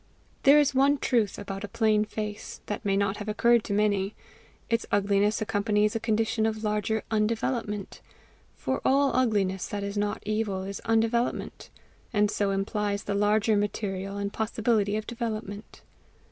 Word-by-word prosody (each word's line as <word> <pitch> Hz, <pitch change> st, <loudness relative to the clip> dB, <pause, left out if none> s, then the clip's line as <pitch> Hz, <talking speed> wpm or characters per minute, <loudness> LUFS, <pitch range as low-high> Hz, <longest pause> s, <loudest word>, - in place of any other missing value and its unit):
There 280 Hz, +2 st, +7 dB
is 290 Hz, -2 st, +4 dB
one 275 Hz, +2 st, +4 dB
truth 230 Hz, -7 st, +1 dB
about 195 Hz, 0 st, -6 dB
a -, -, -3 dB
plain 215 Hz, 0 st, +2 dB
face, 210 Hz, -1 st, -6 dB
that 205 Hz, -, -4 dB
may 195 Hz, -2 st, +1 dB
not 200 Hz, 0 st, 0 dB
have 210 Hz, 0 st, -5 dB
occurred 235 Hz, +2 st, +3 dB
to 205 Hz, -, -2 dB
many: 200 Hz, -1 st, +1 dB, 0.5 s
its 230 Hz, -1 st, 0 dB
ugliness 205 Hz, +2 st, +2 dB
accompanies 210 Hz, 0 st, +1 dB
a -, -, +1 dB
condition 220 Hz, 0 st, +1 dB
of 220 Hz, 0 st, -3 dB
larger 210 Hz, +1 st, 0 dB
undevelopment, 215 Hz, -1 st, -1 dB, 0.5 s
for -, -, -2 dB
all 275 Hz, +1 st, +3 dB
ugliness 205 Hz, -7 st, +1 dB
that 205 Hz, -1 st, -4 dB
is 200 Hz, +1 st, -3 dB
not 205 Hz, 0 st, -2 dB
evil, 210 Hz, -3 st, -1 dB
is 195 Hz, +1 st, -6 dB
undevelopment; 225 Hz, +1 st, 0 dB, 0.4 s
and 210 Hz, -2 st, +2 dB
so 205 Hz, -2 st, 0 dB
implies 200 Hz, +1 st, -1 dB
the 205 Hz, -, -2 dB
larger 210 Hz, +2 st, +2 dB
material 200 Hz, -1 st, -2 dB
and 200 Hz, 0 st, -3 dB
possibility 220 Hz, -2 st, 0 dB
of 215 Hz, -, -4 dB
development. 220 Hz, -3 st, -5 dB
210 Hz, 155 wpm, -27 LUFS, 205-225 Hz, 0.5 s, There